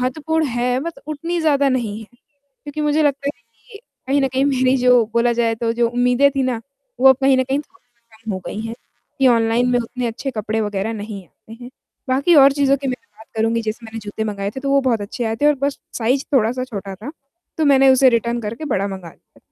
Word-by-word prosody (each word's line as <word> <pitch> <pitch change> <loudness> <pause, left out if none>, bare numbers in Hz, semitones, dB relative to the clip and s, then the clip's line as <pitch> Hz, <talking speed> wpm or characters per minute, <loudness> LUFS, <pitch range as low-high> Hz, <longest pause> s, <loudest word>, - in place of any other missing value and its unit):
महत्वपूर्ण 310 +5 -1
है 245 +1 0
बट 335 +3 -6
उतनी 330 +3 -3
ज़्यादा 285 -3 +3
नहीं 235 -5 -1
है। 220 - -11 0.6
क्योंकि 290 +1 -6
मुझे 300 +1 +2
लगता 280 -1 0
है - - +2
ना - - -38
कि 425 -4 -13 0.3
कहीं 280 +1 +2
न 270 - +2
कहीं 265 +1 +1
मेरी 260 -2 +2
जो 250 -2 +4
बोला 235 +1 +3
जाए 230 -1 +1
तो 230 0 -1
जो 235 0 +1
उम्मीदें 245 +3 +3
थी 275 -1 -1
ना 250 -3 -1 0.4
वो 265 - +7
अब 265 - +6
कहीं 270 0 +5
न - - +3
कहीं 270 +2 -1
थोड़ी 240 -9 -23
कम 220 - -3
हो 190 - -3
गई 215 - -5
हैं 225 - -5 0.4
कि 265 -1 +5
ऑनलाइन 230 +1 +2
में 245 - +3
उतने 245 +1 -4
अच्छे 235 +4 -4
कपड़े 220 -1 -2
वगैरह 205 +1 -2
नहीं 205 -2 -7
आते 220 - -19
हैं। 245 - -10 0.4
बाकी 275 +7 +3
और 275 0 +7
चीज़ों 275 -1 +2
कि 275 - -1
मैं 250 - -1 0.2
बात 220 - -15
करूँगी 225 +1 +1
जैसे 220 +1 -5
मैंने 225 0 -7
जूते 210 +1 -5
मँगाए 200 -2 -3
थे 265 +5 -7
तो 275 - -2
वो 275 0 +4
बहुत 250 -5 0
अच्छे 205 +4 -4
आए 225 0 -1
थे 290 - +1
और 295 - +5
बस 280 0 -1 0.2
साइज़ 250 +4 +1
थोड़ा-सा 250 +1 +2
छोटा 200 -6 -7
था, 215 +9 -8 0.5
तो 315 - +2
मैंने 270 -2 +5
उसे 260 0 +6
रिटर्न 235 0 0
करके 230 +6 -5
बड़ा 200 -9 -1
मँगा 190 -3 -7
लिया। - - -21
245 Hz, 235 wpm, -20 LUFS, 225-275 Hz, 0.6 s, वो